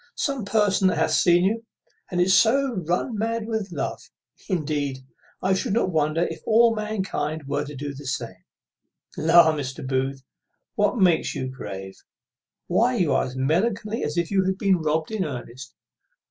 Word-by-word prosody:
some 275 Hz, -5 st, -2 dB
person 200 Hz, -2 st, +2 dB
that 185 Hz, -, +1 dB
hath 160 Hz, -, +1 dB
seen 175 Hz, 0 st, +4 dB
you, 225 Hz, +4 st, 0 dB, 0.5 s
and 180 Hz, -1 st, +1 dB
so 250 Hz, +7 st, +4 dB
is 180 Hz, -6 st, -5 dB
run 185 Hz, +7 st, 0 dB
mad 225 Hz, +1 st, -2 dB
with 220 Hz, -4 st, -3 dB
love. -, -, -3 dB, 0.5 s
Indeed, 150 Hz, -6 st, -1 dB, 0.5 s
I 190 Hz, +1 st, +3 dB
should 195 Hz, +3 st, -1 dB
not 210 Hz, -4 st, +1 dB
wonder 155 Hz, +1 st, +1 dB
if -, -, -4 dB
all 230 Hz, +1 st, +4 dB
mankind 190 Hz, -8 st, -3 dB
were 140 Hz, -, -1 dB
to 150 Hz, -, -8 dB
do 145 Hz, +1 st, -5 dB
the 140 Hz, 0 st, -9 dB
same. 115 Hz, -8 st, -5 dB, 0.7 s
La! 165 Hz, +1 st, +5 dB
Mr. 135 Hz, -3 st, -5 dB
Booth, 135 Hz, 0 st, -1 dB, 0.5 s
what 205 Hz, +4 st, +1 dB
makes 180 Hz, -5 st, +2 dB
you 130 Hz, -, -3 dB
grave? 95 Hz, -7 st, -8 dB, 0.7 s
why, 125 Hz, -, +2 dB
you 160 Hz, -7 st, +2 dB
are -, -, +2 dB
as 130 Hz, 0 st, -7 dB
melancholy 200 Hz, -, 0 dB
as 150 Hz, +3 st, -3 dB
if 170 Hz, +1 st, 0 dB
you 195 Hz, -1 st, +3 dB
had 190 Hz, 0 st, 0 dB
been 195 Hz, -2 st, +3 dB
robbed 155 Hz, +2 st, -1 dB
in 215 Hz, -3 st, -1 dB
earnest. 130 Hz, -3 st, -7 dB
170 Hz, 170 wpm, -24 LUFS, 140-205 Hz, 0.7 s, La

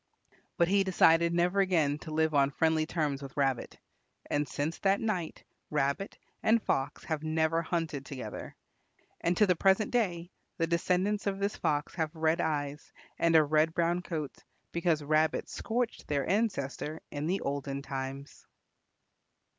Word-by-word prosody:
But 170 Hz, -, +4 dB
he 195 Hz, +2 st, +3 dB
decided 170 Hz, -3 st, +4 dB
never 175 Hz, +3 st, +2 dB
again 160 Hz, -7 st, +2 dB
to 160 Hz, -, -9 dB
live 160 Hz, 0 st, +1 dB
on 140 Hz, -1 st, +4 dB
friendly 160 Hz, +2 st, +1 dB
terms 150 Hz, -5 st, -1 dB
with 135 Hz, 0 st, -9 dB
Rabbit. 135 Hz, -3 st, 0 dB, 0.5 s
And 145 Hz, 0 st, 0 dB
since 150 Hz, +4 st, -3 dB
that 195 Hz, 0 st, +2 dB
night 185 Hz, -8 st, -3 dB, 0.3 s
Rabbit 145 Hz, +6 st, -1 dB, 0.2 s
and 225 Hz, +1 st, +4 dB
Fox 140 Hz, -8 st, -2 dB
have 160 Hz, -2 st, -2 dB
never 160 Hz, +1 st, +1 dB
hunted 165 Hz, -4 st, -2 dB
together. 130 Hz, -7 st, -7 dB, 0.6 s
And 175 Hz, +1 st, 0 dB
to 210 Hz, -, +6 dB
the 180 Hz, -2 st, +3 dB
present 195 Hz, +4 st, +3 dB
day 180 Hz, -7 st, 0 dB, 0.3 s
the 165 Hz, -, +2 dB
descendants 185 Hz, +5 st, 0 dB
of 195 Hz, -1 st, 0 dB
this 200 Hz, +1 st, -1 dB
Fox 145 Hz, 0 st, -1 dB
have 160 Hz, -2 st, -2 dB
red 160 Hz, +2 st, +1 dB
eyes 145 Hz, -2 st, -2 dB, 0.3 s
and 165 Hz, -1 st, +3 dB
a 155 Hz, -, +8 dB
red 155 Hz, +2 st, +2 dB
brown 170 Hz, +1 st, +1 dB
coat, 155 Hz, -6 st, -5 dB, 0.3 s
because 170 Hz, -3 st, +1 dB
Rabbit 155 Hz, +2 st, +1 dB
scorched 240 Hz, +1 st, -3 dB
their 140 Hz, -2 st, 0 dB
ancestor 160 Hz, -, -1 dB
in 145 Hz, +1 st, -3 dB
the 190 Hz, +3 st, 0 dB
olden 140 Hz, 0 st, -3 dB
times. 135 Hz, +1 st, -6 dB
160 Hz, 155 wpm, -30 LUFS, 145-180 Hz, 0.6 s, a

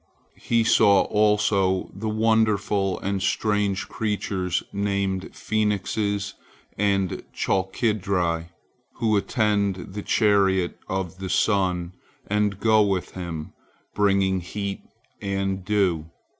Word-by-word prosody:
He 115 Hz, -1 st, +2 dB
saw 100 Hz, -3 st, +5 dB
also 105 Hz, -3 st, +2 dB
the 110 Hz, +3 st, -4 dB
wonderful 105 Hz, -3 st, +1 dB
and 100 Hz, -1 st, -2 dB
strange 105 Hz, 0 st, 0 dB
creatures 100 Hz, -4 st, -2 dB
named 100 Hz, -2 st, -1 dB
phoenixes 105 Hz, -1 st, -1 dB, 0.4 s
and 100 Hz, -2 st, 0 dB
chalkidri, 95 Hz, -4 st, 0 dB, 0.5 s
who 110 Hz, -2 st, +1 dB
attend 100 Hz, -3 st, 0 dB
the 105 Hz, -, -4 dB
chariot 100 Hz, -5 st, +2 dB
of 95 Hz, -1 st, -3 dB
the 95 Hz, -1 st, -5 dB
sun, 90 Hz, -3 st, +1 dB, 0.3 s
and 105 Hz, -1 st, 0 dB
go 110 Hz, 0 st, +4 dB
with 95 Hz, -3 st, 0 dB
him, 85 Hz, -4 st, -6 dB, 0.4 s
bringing 95 Hz, -2 st, +2 dB
heat 100 Hz, +2 st, -4 dB, 0.4 s
and 95 Hz, -1 st, -2 dB
dew. 90 Hz, -6 st, 0 dB
100 Hz, 100 wpm, -24 LUFS, 95-105 Hz, 0.5 s, saw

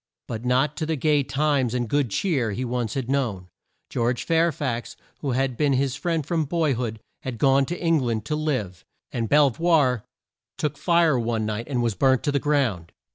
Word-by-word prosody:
But 115 Hz, -1 st, -5 dB
not 130 Hz, +4 st, +1 dB
to 155 Hz, -, -2 dB
the 160 Hz, -, 0 dB
gay 150 Hz, +1 st, +2 dB
times 135 Hz, -2 st, 0 dB
and 120 Hz, -1 st, -1 dB
good 140 Hz, +1 st, +1 dB
cheer 125 Hz, -, 0 dB
he 125 Hz, +5 st, -3 dB
once 120 Hz, -2 st, -2 dB
had 130 Hz, -3 st, -2 dB
known. 115 Hz, -10 st, -1 dB, 0.4 s
George 120 Hz, +1 st, -1 dB
Fair 165 Hz, +1 st, +2 dB
fax 125 Hz, -6 st, -4 dB, 0.2 s
who 135 Hz, -4 st, -2 dB
had 130 Hz, 0 st, 0 dB
been 145 Hz, +2 st, +2 dB
his 135 Hz, 0 st, +1 dB
friend 160 Hz, +1 st, -1 dB
from 160 Hz, 0 st, 0 dB
boy 155 Hz, -1 st, +1 dB
hood 115 Hz, -2 st, -3 dB, 0.2 s
had 130 Hz, -3 st, -5 dB
gone 135 Hz, +1 st, +3 dB
to 175 Hz, -, -3 dB
Eng 165 Hz, -2 st, +2 dB
land 115 Hz, -5 st, -2 dB
to 150 Hz, -, -1 dB
live, 130 Hz, -, -2 dB, 0.3 s
and 115 Hz, -3 st, -2 dB
Bel 145 Hz, -2 st, +5 dB
voir 145 Hz, -7 st, +2 dB, 0.5 s
took 150 Hz, -1 st, -1 dB
fire 170 Hz, -5 st, +3 dB
one 115 Hz, -2 st, -1 dB
night 110 Hz, +2 st, -3 dB
and 125 Hz, -4 st, 0 dB
was 115 Hz, -2 st, +1 dB
burnt 130 Hz, +6 st, +2 dB
to 145 Hz, -, +1 dB
the 140 Hz, -, +1 dB
ground. 125 Hz, -, 0 dB
135 Hz, 200 wpm, -24 LUFS, 120-150 Hz, 0.5 s, Bel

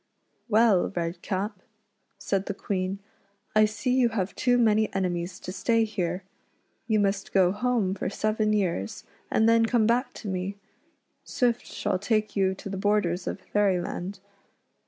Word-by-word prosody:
" -, -, -44 dB
Well, 220 Hz, -6 st, +4 dB
Redcap," 185 Hz, +4 st, -3 dB, 0.6 s
said 195 Hz, -1 st, -1 dB
the 200 Hz, -, -3 dB
Queen, 190 Hz, -1 st, -2 dB, 0.3 s
" 200 Hz, +2 st, -41 dB
I 215 Hz, 0 st, +7 dB
see 215 Hz, +4 st, -2 dB
you 255 Hz, -2 st, +4 dB
have 205 Hz, -4 st, -2 dB
too 245 Hz, -1 st, +2 dB
many 220 Hz, -2 st, +3 dB
enemies 180 Hz, -1 st, -2 dB
to 185 Hz, -, -6 dB
stay 230 Hz, +4 st, +2 dB
here. 185 Hz, -4 st, -2 dB, 0.6 s
You 220 Hz, -2 st, +2 dB
must 195 Hz, -1 st, 0 dB
go 185 Hz, -2 st, +4 dB
home 215 Hz, -2 st, 0 dB
for 195 Hz, -, -3 dB
seven 215 Hz, +1 st, 0 dB
years, 175 Hz, -, -1 dB, 0.3 s
and 220 Hz, -, +3 dB
then 230 Hz, 0 st, +5 dB
come 230 Hz, -2 st, +3 dB
back 245 Hz, +3 st, +1 dB
to 215 Hz, -, -8 dB
me. 190 Hz, +1 st, -3 dB, 0.7 s
Swift 240 Hz, -2 st, 0 dB
shall 185 Hz, -, -2 dB
take 215 Hz, +1 st, 0 dB
you 190 Hz, -1 st, +2 dB
to 190 Hz, -, -9 dB
the 195 Hz, 0 st, -4 dB
borders 190 Hz, -3 st, +1 dB
of -, -, -4 dB
Fairyland. 190 Hz, -1 st, -1 dB
205 Hz, 155 wpm, -27 LUFS, 185-220 Hz, 0.7 s, I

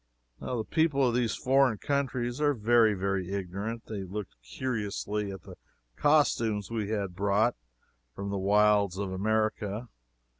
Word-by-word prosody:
The 120 Hz, -3 st, -3 dB
people 150 Hz, -2 st, +2 dB
of 120 Hz, -, +1 dB
those 120 Hz, -2 st, +1 dB
foreign 130 Hz, -3 st, +3 dB
countries 130 Hz, -1 st, -1 dB
are 145 Hz, -1 st, +3 dB
very, 115 Hz, -1 st, +4 dB
very 95 Hz, -1 st, -2 dB
ignorant. 100 Hz, +4 st, -4 dB
They 105 Hz, -3 st, -5 dB
looked 95 Hz, +2 st, -6 dB
curiously 105 Hz, -, -3 dB
at 95 Hz, -, -9 dB
the -, -, -12 dB, 0.4 s
costumes 115 Hz, -9 st, +2 dB
we 110 Hz, -3 st, -2 dB
had 100 Hz, -4 st, -2 dB
brought 100 Hz, +5 st, +2 dB, 0.6 s
from 100 Hz, 0 st, -4 dB
the 100 Hz, -, -2 dB
wilds 100 Hz, -1 st, +3 dB
of 100 Hz, -1 st, -3 dB
America. 110 Hz, +2 st, -1 dB
105 Hz, 140 wpm, -29 LUFS, 100-120 Hz, 0.6 s, very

